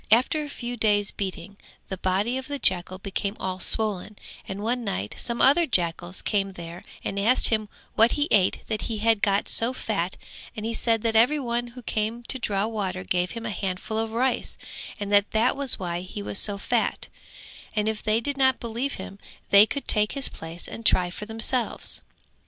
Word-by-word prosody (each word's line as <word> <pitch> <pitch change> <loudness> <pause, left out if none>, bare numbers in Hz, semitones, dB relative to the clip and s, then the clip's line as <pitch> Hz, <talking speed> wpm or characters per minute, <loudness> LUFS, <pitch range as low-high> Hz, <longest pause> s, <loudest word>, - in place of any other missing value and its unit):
After 250 +8 +4
a 295 - -7
few 245 -3 -5
days 205 -2 +3
beating 195 0 -5 0.3
the 190 - -5
body 195 +6 0
of 265 0 -4
the 285 - -3
jackal 185 -5 0
became 200 +2 -3
all 185 0 -3
swollen 210 0 +1 0.3
and 195 +2 -5
one 240 +2 0
night 190 - -3
some 235 -1 +1
other 315 +5 +5
jackals 175 -3 -1
came 195 -2 0
there 170 -1 -9 0.2
and 200 - -2
asked 230 +6 +4
him 215 -2 0 0.2
what 225 +2 +4
he 290 0 +1
ate 190 -3 +3
that 215 -2 -3
he 225 - -2
had 220 -1 +2
got 200 0 +2
so 235 +3 +2
fat 195 -8 -2 0.4
and 215 - -4
he 230 - -2
said 225 -1 +1
that 225 -1 0
every 245 +7 +5
one 240 -2 -2
who 250 - -9
came 220 +2 -2
to 260 +2 -2
draw 205 -3 0
water 195 -5 -3
gave 180 0 0
him 230 - -6
a 225 - -2
handful 195 +3 -3
of 225 0 -2
rice 250 +3 -1 0.4
and 205 0 -3
that 220 +4 +3
was 275 -2 +5
why 175 -3 -3
he 190 +3 -7
was 200 - 0
so 205 -1 +2
fat; 200 - -1 0.7
and 210 0 +1
if 220 -1 -2
they 215 +1 +2
did 280 +4 -3
not 265 -2 +3
believe 235 +4 -3
him 195 +1 -9 0.3
they 200 +2 +9
could 275 +6 -4
take 210 -1 +4
his 275 -2 +2
place 165 +2 -7
and 230 - -8
try 180 -4 +3
for 210 +3 -7
themselves. 225 +2 -1
215 Hz, 200 wpm, -25 LUFS, 195-235 Hz, 0.7 s, they